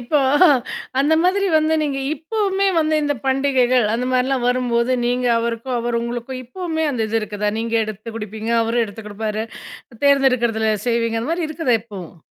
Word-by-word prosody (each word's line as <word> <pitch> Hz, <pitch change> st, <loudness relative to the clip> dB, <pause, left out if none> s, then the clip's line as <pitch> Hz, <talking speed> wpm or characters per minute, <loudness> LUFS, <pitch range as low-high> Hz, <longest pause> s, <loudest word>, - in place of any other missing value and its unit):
இப்போ 245 Hz, +5 st, +1 dB, 0.8 s
அந்த 295 Hz, +3 st, +3 dB
மாதிரி 390 Hz, +3 st, +2 dB
வந்து 310 Hz, +1 st, +2 dB
நீங்க 280 Hz, -2 st, -1 dB, 0.2 s
இப்பவுமே 395 Hz, +4 st, -1 dB
வந்து 310 Hz, -1 st, +1 dB
இந்த 290 Hz, 0 st, 0 dB
பண்டிகைகள் 260 Hz, -2 st, +2 dB
அந்த 235 Hz, +2 st, -1 dB
மாரிலாம் 255 Hz, 0 st, +1 dB
வரும்போது, 245 Hz, -1 st, +1 dB
நீங்க 250 Hz, +1 st, 0 dB
அவருக்கும், 235 Hz, +2 st, -2 dB
அவர் 235 Hz, 0 st, -1 dB
உங்களுக்கும், 240 Hz, +2 st, -5 dB
இப்பவுமே 320 Hz, +4 st, -3 dB
அந்த 240 Hz, -5 st, -1 dB
இது 225 Hz, +1 st, +1 dB
இருக்குதா? 210 Hz, -1 st, -2 dB
நீங்க 230 Hz, 0 st, -1 dB
எடுத்து 215 Hz, +1 st, -8 dB
குடுப்பீங்க, 220 Hz, +1 st, -5 dB
அவரும் 230 Hz, +1 st, +1 dB
எடுத்து 215 Hz, +1 st, -10 dB
குடுப்பாரு. 215 Hz, +1 st, -3 dB, 0.6 s
தேர்ந்தெடுக்கர்தல 240 Hz, -6 st, +3 dB
செய்வீங்க 230 Hz, -1 st, 0 dB
அந்த 280 Hz, -, -3 dB
மாரி 335 Hz, -1 st, -1 dB
இருக்குதா 310 Hz, -6 st, +1 dB
இப்பவும்? 190 Hz, -7 st, -10 dB
245 Hz, 155 wpm, -20 LUFS, 225-280 Hz, 0.8 s, அந்த